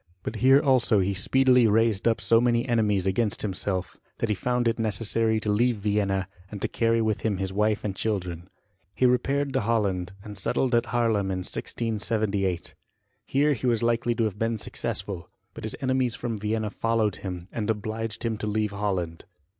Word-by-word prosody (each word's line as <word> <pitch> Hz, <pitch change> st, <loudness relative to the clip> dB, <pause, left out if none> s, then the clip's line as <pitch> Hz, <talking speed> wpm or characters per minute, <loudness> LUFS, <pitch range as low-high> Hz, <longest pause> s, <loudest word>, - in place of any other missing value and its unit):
But 110 Hz, -, -4 dB
here 135 Hz, +4 st, +6 dB
also 130 Hz, -6 st, +3 dB
he 100 Hz, 0 st, +1 dB
speedily 125 Hz, +4 st, +4 dB
raised 110 Hz, -1 st, +2 dB
up 115 Hz, 0 st, +2 dB
so 115 Hz, 0 st, +4 dB
many 120 Hz, +1 st, +2 dB
enemies 105 Hz, -5 st, +2 dB
against 100 Hz, +2 st, 0 dB
himself, 95 Hz, -2 st, -3 dB, 0.2 s
that 115 Hz, -, -1 dB
he -, -, +3 dB
found 125 Hz, +5 st, 0 dB
it 115 Hz, 0 st, 0 dB
necessary 110 Hz, +1 st, +1 dB
to 105 Hz, -, 0 dB
leave 120 Hz, +2 st, +2 dB
Vienna, 100 Hz, -2 st, 0 dB, 0.2 s
and 105 Hz, -, -7 dB
to -, -, +3 dB
carry 115 Hz, 0 st, +1 dB
with 110 Hz, -2 st, 0 dB
him 105 Hz, -4 st, 0 dB
his 95 Hz, 0 st, -3 dB
wife 105 Hz, +1 st, +1 dB
and 100 Hz, -3 st, -2 dB
children. 90 Hz, -5 st, -3 dB, 0.5 s
He 130 Hz, -, +2 dB
repaired 135 Hz, +3 st, +1 dB
to -, -, +1 dB
Holland, 100 Hz, -5 st, 0 dB
and 105 Hz, -2 st, -8 dB
settled 120 Hz, +6 st, 0 dB
at 115 Hz, -, +3 dB
Haerlem 115 Hz, -5 st, +1 dB
in 95 Hz, -1 st, -2 dB
1678. 105 Hz, -5 st, -2 dB, 0.5 s
Here 145 Hz, +2 st, +3 dB
he 130 Hz, -1 st, -2 dB
was 115 Hz, -2 st, +2 dB
likely 120 Hz, 0 st, +1 dB
to 115 Hz, -, +1 dB
have 105 Hz, -2 st, -2 dB
been 115 Hz, 0 st, 0 dB
successful; 95 Hz, -3 st, -4 dB, 0.2 s
but -, -, -7 dB
his 110 Hz, -, -3 dB
enemies 130 Hz, -2 st, +1 dB
from 120 Hz, -2 st, -3 dB
Vienna 105 Hz, 0 st, -1 dB
followed 110 Hz, -2 st, 0 dB
him, 90 Hz, -2 st, -6 dB
and 110 Hz, -2 st, -3 dB
obliged 110 Hz, 0 st, -3 dB
him 115 Hz, -2 st, -1 dB
to 105 Hz, -, -4 dB
leave 105 Hz, 0 st, 0 dB
Holland. 95 Hz, -5 st, -3 dB
110 Hz, 185 wpm, -26 LUFS, 100-115 Hz, 0.5 s, here